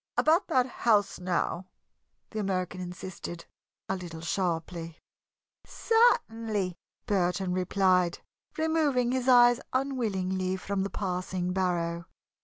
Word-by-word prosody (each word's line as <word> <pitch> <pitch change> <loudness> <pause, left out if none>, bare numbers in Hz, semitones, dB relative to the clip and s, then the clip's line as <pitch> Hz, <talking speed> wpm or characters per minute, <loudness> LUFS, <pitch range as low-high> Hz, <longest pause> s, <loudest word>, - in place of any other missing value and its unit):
"About 330 +5 +3
that 260 -7 +3
house, 220 -5 +1
now," 180 0 -1 0.6
the 220 - -4
American 185 -2 -2
insisted, 180 -1 -7 0.4
a 190 - -1
little 170 -3 -7
sharply. 165 -1 -2 0.7
"Certainly," 225 - +1 0.3
Burton 185 -3 0
replied, 185 -1 +2 0.4
removing 305 -6 +1
his 255 0 -1
eyes 245 -1 +7
unwillingly 190 -9 -1
from 200 +1 -2
the 195 - -1
passing 180 -1 -2
barrow. 170 -2 -1
190 Hz, 100 wpm, -28 LUFS, 180-240 Hz, 0.7 s, eyes